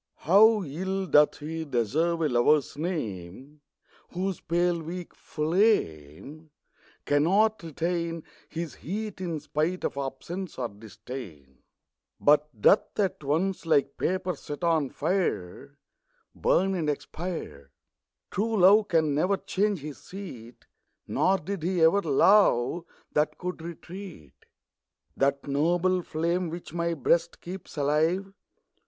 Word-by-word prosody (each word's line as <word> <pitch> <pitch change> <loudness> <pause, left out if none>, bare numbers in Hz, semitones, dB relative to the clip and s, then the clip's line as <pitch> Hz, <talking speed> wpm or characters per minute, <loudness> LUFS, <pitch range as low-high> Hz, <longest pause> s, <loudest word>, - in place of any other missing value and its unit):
HOW 210 +5 +6
ill 190 +6 -3
doth 150 -2 +4
lie 160 +1 -4
deserve 155 +6 0
a - - +3
Lover's 130 +4 +3
name 140 - -5 0.5
Whose 185 0 -2
pale 175 0 +1
weak 175 +2 -7
flame 155 - -1 0.6
Cannot 195 +10 +3
retain 170 0 -3 0.3
His 165 -1 -5
heat, 210 +3 -5
in 170 -4 -3
spite 155 +5 -2
of - - -2
absence 165 +8 -5
or 120 -2 -2
disdain; 100 - -10 0.6
But 150 +1 +4
doth 195 - +3
at 190 -6 0
once, 165 +5 -1
like 145 -3 +2
paper 185 -1 -1
set 145 +2 -8
on 160 -5 +2
fire, 160 - -2 0.6
Burn 195 +1 +2
and 165 -5 -1
expire! 150 - -5 0.6
True 220 +3 0
love 205 +4 +6
can 160 -4 +2
never 180 +7 +2
change 200 -3 -1
his 150 0 -8
seat; 130 - -10 0.4
Nor 195 +1 +2
did 195 +2 -5
he 180 +2 0
ever 165 +5 +5
love 165 - +3 0.3
that 150 +1 +1
can 180 0 -3
retreat. 170 - -9 0.8
That 140 0 +1
noble 175 +6 +1
flame, 170 +2 -1
which 170 -1 -8
my 170 0 -1
Ijreast 160 +4 +1
keeps 180 -2 -9
alive. 160 +7 +1
165 Hz, 120 wpm, -27 LUFS, 145-185 Hz, 0.8 s, HOW